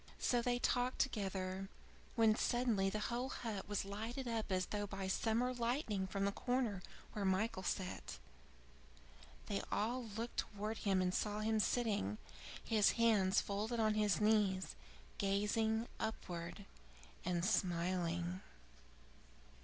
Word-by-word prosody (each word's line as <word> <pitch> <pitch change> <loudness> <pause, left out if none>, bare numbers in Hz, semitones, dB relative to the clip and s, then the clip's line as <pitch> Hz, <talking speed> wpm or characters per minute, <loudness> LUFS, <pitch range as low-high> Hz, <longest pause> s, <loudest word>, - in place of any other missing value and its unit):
'" - - -20
So 245 -1 +2
they 245 0 +1
talked 245 +1 +1
together, 195 -5 -1 0.5
when 225 -2 +6
suddenly 230 -4 +2
the 205 - -2 0.2
whole 250 +2 -1
hut 220 -7 -4
was 205 -1 0
lighted 225 +6 -4
up 225 -3 -2
as 185 -1 +2
though 205 -1 -2
by 195 -1 -4
summer 230 +6 +1
lightning 235 -5 0
from 195 +1 -1
the 200 - +2
corner 245 -4 0 0.3
where 210 - -2
Michael 190 +2 +1
sat. 185 0 -3 1.3
They 200 - -1
all 240 +4 0
looked 225 +2 -5
towards 210 +2 -2
him 190 -2 +3
and 180 0 +1
saw 210 +1 0
him 220 0 +2
sitting, 205 - +1 0.5
his 215 -2 +4
hands 210 -5 +4
folded 215 +4 -2
on 215 -1 +3
his 210 -1 +2
knees, 210 -3 +2 0.4
gazing 220 +3 +1
upwards 175 -4 -4 0.6
and 175 -1 0
smiling. 175 -2 0
210 Hz, 130 wpm, -38 LUFS, 190-230 Hz, 1.3 s, when